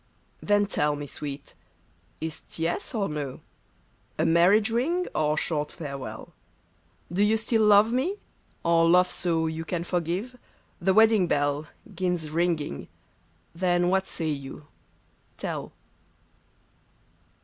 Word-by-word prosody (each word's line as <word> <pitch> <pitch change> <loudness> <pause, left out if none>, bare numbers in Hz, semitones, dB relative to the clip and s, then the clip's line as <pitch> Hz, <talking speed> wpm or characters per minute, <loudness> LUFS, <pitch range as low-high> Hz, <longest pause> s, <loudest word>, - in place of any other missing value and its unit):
Then 205 0 +3
tell 150 -7 0
me, 145 0 -6
sweet; 140 0 -7 0.7
is't 160 0 -5
yes 165 +7 -1
or 200 -3 0
no 145 -3 -5 0.4
— 105 +6 -38
A 155 - +1
marriage 185 +7 +4
ring, 330 +11 0
or 150 0 +1
short 150 -2 -1
farewell? 140 -5 -7 0.8
Do 190 - +1
you 215 +2 +4
still 220 0 +1
love 210 +2 +6
me, 290 +11 0 0.5
or 165 0 +4
love 180 +1 +5
so 165 -2 0
You 160 0 -3
can 170 +1 -3
forgive? 180 +8 -2 0.2
— - - -37
The 190 +2 +2
wedding 220 -4 +5
bell 145 0 0 0.3
'Gins 180 -4 -2
ringing 160 - -1 0.3
— - - -38
then 175 -1 +3
what 190 +1 +1
say 160 -1 -1
you? 140 0 -6 0.7
tell. - - -4
170 Hz, 130 wpm, -26 LUFS, 150-200 Hz, 0.8 s, love